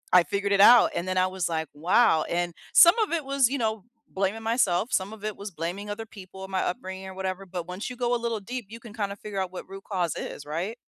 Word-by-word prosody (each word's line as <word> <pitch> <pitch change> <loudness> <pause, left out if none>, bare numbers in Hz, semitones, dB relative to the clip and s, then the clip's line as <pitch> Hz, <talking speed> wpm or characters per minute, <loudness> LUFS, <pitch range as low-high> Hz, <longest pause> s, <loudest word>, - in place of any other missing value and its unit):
I 180 - +9
figured 200 +1 -2
it 200 0 +4
out, 240 +3 +8
and 175 - -3
then 185 0 -1
I 185 - +4
was 185 -2 -2
like, 160 -1 -2
"Wow." 165 +3 +3
And, 175 0 -1 0.2
some 340 +6 +8
of 430 -6 +1
it 325 -4 -1
was, 275 -2 +3
you 280 - -1
know, 220 -4 -2 0.2
blaming 200 +3 -2
myself, 225 -2 +1
some 190 +2 0
of 215 -2 -11
it 215 -2 -3
was 200 +1 -7
blaming 175 +5 -5
other 215 +2 -5
people 190 -3 -11
and 190 - -8
my 190 - 0
upbringing 190 +1 -4
or 190 - -9
whatever, 190 0 -4
but 175 -1 -5
once 180 +6 -5
you 250 - -7
go 245 0 0
a - - +3
little 230 -2 -1
deep, 240 +2 -6
you 230 +2 -9
can 230 -2 -12
kinda 200 -3 -3
figure 205 -1 -6
out 185 -1 -3
what 185 - -8
root 195 0 -10
cause 180 -5 0
is, 145 - -6
right? 170 +10 -4
195 Hz, 265 wpm, -26 LUFS, 185-225 Hz, 0.2 s, I